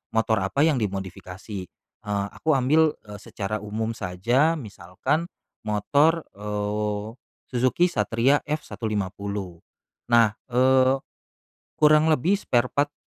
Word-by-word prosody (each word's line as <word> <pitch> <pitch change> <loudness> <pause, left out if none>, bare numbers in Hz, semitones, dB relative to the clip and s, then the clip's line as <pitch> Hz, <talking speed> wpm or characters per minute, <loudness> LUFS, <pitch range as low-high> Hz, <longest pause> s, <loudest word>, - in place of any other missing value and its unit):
motor 110 -1 +2
apa 95 +10 +1
yang 155 -5 +3
dimodifikasi. 95 0 -5
Eee, 100 +3 -6
aku 155 -2 0
ambil, 150 +4 +3
eee, 105 -1 -10
secara 105 +1 -4
umum 110 +2 -3
saja 115 - +1
misalkan 110 - -3 0.4
motor, 145 +10 +2
eee, 105 +2 -3 0.3
Suzuki 130 +8 +2
Satria 130 0 +2
F150. 100 - -4 0.5
Nah, 115 -2 +5 0.2
eee, 130 +1 +4 0.8
kurang 150 0 +5
lebih 160 +5 +2
spare 125 -9 +1
part, 145 0 0
115 Hz, 105 wpm, -24 LUFS, 105-145 Hz, 0.8 s, Nah